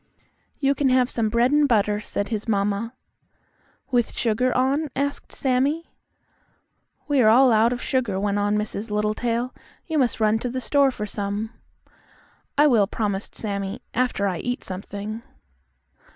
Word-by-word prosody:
"You 275 -1 +2
can 280 -1 +1
have 255 -1 +3
some 225 -2 0
bread 235 +3 +2
and 295 0 +4
butter," 210 -4 +2
said 200 -1 -3
his 220 -1 -3
mamma. 205 +3 0 1.0
"With 240 -2 +1
sugar 245 +2 +1
on?" 275 +4 +1
asked 285 +1 -2
Sammie. 275 +5 0 1.2
"We 285 -3 +3
are 215 - +6
all 255 +3 +6
out 225 +1 +4
of 245 -1 -3
sugar," 240 -8 0
went 205 0 0
on 205 +1 +1
Mrs. 210 +1 -3
Littletail. 230 +4 -1 0.3
"You 320 -2 0
must 250 -4 +1
run 215 0 +3
to 245 - -3
the 255 +2 -3
store 275 +3 +3
for 215 -5 -4
some." 205 +1 -3 1.1
"I 295 - +6
will," 230 -9 +4
promised 205 -2 -3
Sammie, 200 -1 -4
"after 245 -4 0
I 180 -3 -2
eat 245 +5 -3
something." 205 +4 -6
230 Hz, 150 wpm, -24 LUFS, 210-255 Hz, 1.2 s, are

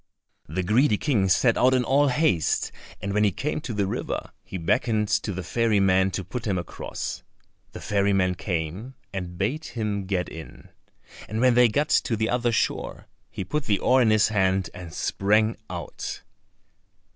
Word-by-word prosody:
The 90 +5 -2
greedy 110 +5 +3
King 105 -10 +1
set 115 +6 +3
out 130 +1 +5
in 125 - +2
all 140 +4 +3
haste, 125 - +1 0.3
and 100 -1 -2
when 105 +1 +2
he 105 - +3
came 150 - -3
to 130 - -5
the 105 -2 0
river 95 - -4
he 95 - -6
beckoned 105 +4 +1
to 110 -1 0
the 95 -1 -5
ferry 115 -2 +1
man 95 0 +3
to 95 - -4
put 110 +6 -5
him 95 -3 0
across. 85 - -5 0.5
The - - -8
ferry 100 -1 +1
man 95 -2 +2
came 90 +7 -4 0.2
and 90 -2 -5
bade 125 - -1
him 105 -4 -3
get 95 -2 -1
in, 80 -1 -11 0.6
and 110 +1 -2
when 125 0 +5
they 120 0 +6
got 145 +7 0
to 115 - +2
the 110 +1 -1
other 120 -1 +1
shore 115 - -1 0.2
he - - -5
put 150 +10 -2
the 105 -2 +2
oar 130 +6 +3
in 115 - +4
his 110 0 +4
hand 95 -3 +1
and 90 -3 -9
sprang 110 +7 +1
out. 85 -3 -6
105 Hz, 180 wpm, -25 LUFS, 95-120 Hz, 0.6 s, they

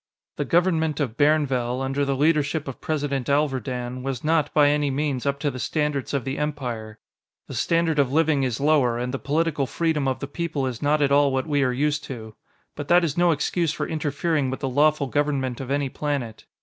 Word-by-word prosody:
The - - -1
government 165 -4 +1
of 125 -7 -2
Bairnvell, 135 -5 +2
under 135 +1 -1
the 140 0 0
leadership 150 +1 +1
of 135 - -7
President 140 -4 -2
Alverdan, 130 -3 -1
was 130 -2 -4
not, 155 -1 +1
by 145 -2 +5
any 145 0 +1
means, 140 -1 -1
up 140 0 0
to 145 - 0
the 130 - -7
standards 150 -1 -1
of 140 -3 -2
the 135 +1 -3
Empire; 125 -8 -4 0.5
the - - -8
standard 165 -2 +1
of 135 -2 +2
living 155 -1 +2
is 125 -4 -1
lower, 140 -5 +3
and 125 +2 -3
the 135 - -2
political 150 -2 0
freedom 155 -2 0
of 130 - 0
the - - -5
people 150 -1 -3
is 125 -4 -4
not 150 +1 +2
at 140 - +2
all 140 0 +4
what 130 0 -1
we 145 -3 +1
are 130 -2 +2
used 145 +3 0
to. 110 -4 -8 0.4
But 145 -1 -6
that 175 +2 +5
is 155 -4 -1
no 175 0 +3
excuse 165 +1 0
for - - -3
interfering 150 -1 -1
with 130 - -5
the 135 - -1
lawful 150 +2 +3
government 135 -2 -1
of 135 - -7
any 140 0 0
planet. 135 -5 -4
145 Hz, 210 wpm, -24 LUFS, 130-150 Hz, 0.5 s, by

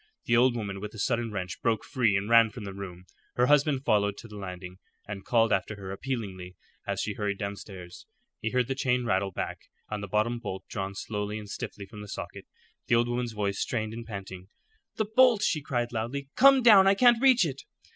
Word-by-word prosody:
The 120 - +3
old 120 +1 +4
woman 100 -4 -4
with 105 +2 -7
a - - -9
sudden 115 +1 -1
wrench 95 -3 -5
broke 115 -3 0
free 115 -7 +2
and 100 +1 -3
ran 115 -1 +6
from 105 +1 -9
the 100 -1 -6
room. 90 -2 -8 0.3
Her 125 - +3
husband 145 -1 +3
followed 100 -4 +2
to - - -10
the 105 - -11
landing, 90 -2 -8 0.3
and 100 -2 -6
called 115 -2 +3
after 100 +2 -1
her 95 -1 -8
appealingly 100 -6 -5 0.3
as - - -2
she 105 - -2
hurried 100 -1 -2
downstairs. 100 -3 -8 0.3
He 110 - -2
heard 125 +1 +1
the 135 - -1
chain 125 -2 0
rattle 95 -3 +1
back - - -4 0.3
and 105 -1 -3
the 100 - -5
bottom 110 +4 0
bolt 95 -5 -6
drawn 100 -2 -4
slowly 105 +1 -4
and 105 -1 -8
stiffly 100 0 -6
from 105 +1 -11
the 105 - -9
socket. - - -7
Then - - -36
the - - +4
old 120 +1 +2
woman's 120 -1 -2
voice, 100 -2 -2
strained 110 -2 -2
and 115 +1 -6
panting. 95 -4 -8 0.5
"The 215 - 0
bolt," 225 0 +4
she 155 -6 +1
cried, 120 -4 -2
loudly. 125 +5 -4
"Come 270 -1 +6
down. 205 -5 +8
I 195 - +5
can't 240 +1 +5
reach 255 -7 +5
it." 140 -3 -4
110 Hz, 215 wpm, -28 LUFS, 100-125 Hz, 0.5 s, down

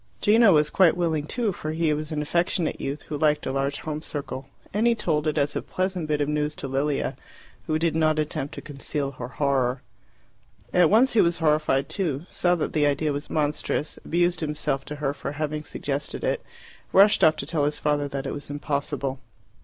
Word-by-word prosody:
Gino 220 0 +6
was 150 -2 +4
quite 180 -2 +4
willing 160 -4 0
too, 230 +1 0
for 155 -3 -5
he 160 -1 +1
was 150 +1 -4
an 150 -1 -1
affectionate 170 +1 0
youth 140 +2 -4
who 150 - -5
liked 150 0 +2
a - - -1
large 135 +1 -1
home 155 -1 -4
circle, 140 -3 -5 0.3
and 215 +4 +2
he 235 - +4
told 155 -7 0
it 155 - 0
as 145 0 +1
a - - -1
pleasant 185 -3 -2
bit 150 -1 0
of 145 - +1
news 150 0 -1
to - - -5
Lilia, 140 +2 -1 0.5
who 155 - +1
did 165 0 0
not 155 -1 +3
attempt 150 -2 -2
to - - -6
conceal 140 -1 -4
her 125 -2 -7
horror. 130 0 0 0.9
At 175 -3 +5
once 235 +6 +5
he 225 - +5
was 170 0 +2
horrified 150 -3 +2
too; 160 -6 -2
saw 175 0 +2
that 165 - -2
the 150 -2 +3
idea 145 +1 +1
was 145 +1 -5
monstrous; 150 0 -1
abused 175 +1 +1
himself 150 -3 -2
to 150 - -6
her 145 -1 -1
for 145 - -5
having 150 0 -3
suggested 140 -1 -4
it; - - 0 0.5
rushed 200 +2 +6
off 155 0 +6
to 150 - -5
tell 150 -1 0
his 150 0 -1
father 145 -1 0
that 140 -1 -4
it 135 - -3
was 145 - -7
impossible. 145 -2 -2
150 Hz, 205 wpm, -25 LUFS, 145-165 Hz, 0.9 s, Gino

